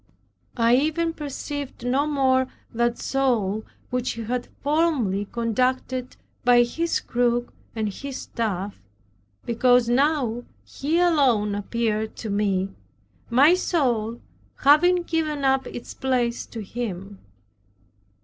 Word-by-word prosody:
I 235 +1 +4
even 315 +4 0
perceived 285 -3 -6
no 270 +4 +1
more 260 -3 +2 0.3
that 235 +1 +1
soul 225 -6 0 0.3
which 250 0 -1
He 230 - -6
had 245 +2 -3 0.2
formerly 285 - +1
conducted 255 +2 -1 0.3
by 245 0 +6
His 330 +8 -1
crook 240 0 0 0.2
and 220 -1 -1
His 265 +6 -6
staff, 205 -4 -3 0.6
because 245 +1 +3
now 250 -2 +1 0.2
He 305 +4 -2
alone 265 -12 +3
appeared 215 +1 -2
to 220 - -5
me, 195 -2 0 0.6
my 280 +8 +6
soul 240 -11 0 0.4
having 350 +5 +4
given 310 -4 -1
up 265 0 +2
its 240 - -8
place 245 -3 -1
to 225 - -7
Him. 200 -3 -5
245 Hz, 110 wpm, -24 LUFS, 225-280 Hz, 0.6 s, by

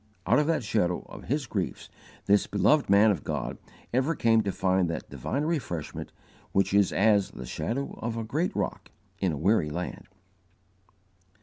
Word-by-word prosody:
Out 120 +8 +4
of 150 - +1
the 165 -1 +2
shadow 90 -5 0
of - - -10
his 140 +1 -1
griefs 100 -6 -3 0.4
this 100 0 +3
beloved 105 +9 +3
man 100 +2 +6
of 85 -9 -3
God - - -3 0.3
ever 130 +6 +2
came 115 -3 +4
to 100 - -1
find 95 -2 +1
that 80 - -5
divine 140 +3 -2
refreshment 140 - -3 0.4
which 100 0 +2
is 100 -2 +4
as 100 -1 +3
the 65 - -9
"shadow 110 - -3
of 115 0 -3
a 115 - -2
great 155 +11 -1
rock - - -3 0.3
in 95 -3 +1
a 75 - -3
weary 90 -1 +2
land." 85 +4 -5
100 Hz, 170 wpm, -28 LUFS, 90-125 Hz, 0.4 s, man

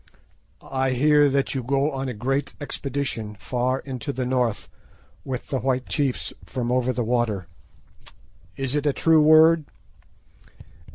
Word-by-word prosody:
"I 130 -1 -1
hear 145 +2 +4
that 140 0 0
you 135 - -2
go 140 +4 0
on 135 -1 -3
a 125 - -5
great 135 +5 -2
expedition 135 -7 -4
far 125 +3 -1
into 135 +1 -5
the 130 -2 -3
North 125 -3 0 0.6
with 130 -2 -5
the 135 - -1
white 130 -1 -1
chiefs 140 -4 -1
from 125 -2 -3
over 125 0 +1
the 125 -1 -2
water. 115 -5 0 1.1
Is 135 -1 -3
it 145 0 0
a 145 - +2
true 160 +1 +4
word?" 155 +1 +6
130 Hz, 145 wpm, -24 LUFS, 125-140 Hz, 1.1 s, word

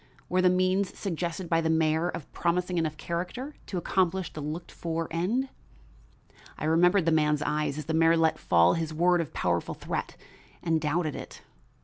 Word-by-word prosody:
Were 185 +1 +2
the 185 - +5
means 185 +2 +1
suggested 175 -1 -3
by 165 0 +2
the 160 - 0
mayor 160 +1 +2
of 160 - -7
promising 175 +1 0
enough 155 -2 -2
character 185 - -4
to 190 - -4
accomplish 185 +1 0
the 155 - -6
looked 155 +4 -5
for 165 -1 -3
end? 215 +11 0 1.1
I - - -4
remembered 175 +3 +4
the 165 - +3
man's 150 -1 +2
eyes 150 -1 -1
as 155 - -5
the 160 - -2
mayor 165 +1 +4
let 160 -1 +2
fall 85 +1 +4
his 160 -1 -3
word 175 +1 +3
of 160 - -6
powerful - - -1
threat, - - -4 0.5
and 160 -2 +1
doubted 155 0 0
it. - - -9
165 Hz, 175 wpm, -28 LUFS, 160-180 Hz, 1.1 s, the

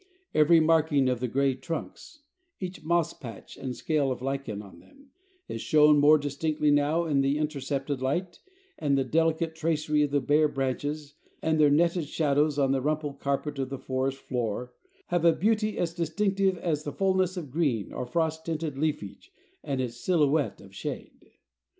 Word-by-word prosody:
Every 155 +2 +6
marking 155 -4 +3
of 125 -2 -1
the 125 - -1
gray 135 +2 +1
trunks, 165 - -7 0.4
each 185 -3 -6
moss 170 0 +1
patch 115 -6 -10
and 130 -2 -5
scale 150 -4 0
of 125 - -3
lichen 135 -5 -3
on 100 -2 -12
them, 280 -1 -21 0.4
is - - -5
shown 150 -2 +5
more 150 +2 +7
distinctly 150 +1 0
now 145 +4 +2
in 145 -4 +2
the 135 +2 +1
intercepted 140 -2 -2
light, 175 +7 -2 0.4
and 140 -2 +1
the 135 - +2
delicate 160 +3 +1
tracery 155 -2 0
of 145 - +2
the 145 0 +2
bare 150 +3 +3
branches 145 +2 -3 0.3
and 160 -1 +1
their 150 -1 +6
netted 170 +3 +2
shadows 150 -1 +1
on 135 -2 +2
the 135 -1 +1
rumpled 150 -1 -2
carpet 140 +1 -2
of 135 -1 -2
the 135 - -4
forest 130 +1 -2
floor, 125 -2 -3 0.4
have 175 -2 +1
a 170 -1 +6
beauty 215 +3 +1
as 170 -1 -1
distinctive 190 +3 0
as 160 -4 -1
the 145 - -4
fullness 190 0 +1
of 150 -7 -6
green 135 -9 0
or 125 - -4
frost 160 +1 -1
tinted 155 -4 -3
leafage 155 - -3 0.3
and 140 -3 -2
its 120 -2 -3
silhouette 150 -1 +1
of 95 0 -15
shade. - - -7
150 Hz, 175 wpm, -27 LUFS, 135-165 Hz, 0.4 s, more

